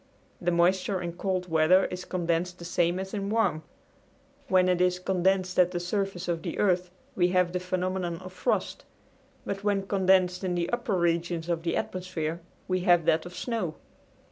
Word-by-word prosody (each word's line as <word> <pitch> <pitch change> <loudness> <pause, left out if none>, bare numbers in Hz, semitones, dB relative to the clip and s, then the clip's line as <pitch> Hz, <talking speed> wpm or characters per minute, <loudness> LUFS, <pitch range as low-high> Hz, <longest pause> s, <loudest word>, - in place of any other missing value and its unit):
The 175 - +1
moisture 185 +3 +2
in 175 -1 -4
cold 185 0 -2
weather 165 +3 +4
is 180 0 -5
condensed 175 0 -1
the 170 - -9
same 175 0 +1
as 190 0 -6
in 200 -1 -2
warm. 220 -8 +1 0.9
When 185 -5 +4
it 180 -1 +2
is 180 0 +3
condensed 185 0 +1
at 180 -1 +6
the 180 -1 -3
surface 185 0 -2
of 170 -2 -1
the - - -5
earth 180 -2 +2 0.3
we 175 -1 +3
have 180 -1 +2
the 180 - -1
phenomenon 185 -1 -2
of 185 +1 -10
frost, 185 - -1 0.6
but 195 0 -4
when 200 -2 +1
condensed 190 -2 +2
in 180 -1 -1
the 170 0 -1
upper 240 -4 -1
regions 170 -1 0
of 170 -1 0
the 165 -1 -1
atmosphere 170 -3 -3 0.3
we 185 0 +1
have 175 -2 +4
that 160 +2 +2
of 180 - -11
snow. 220 -10 -3
180 Hz, 180 wpm, -28 LUFS, 175-190 Hz, 0.9 s, at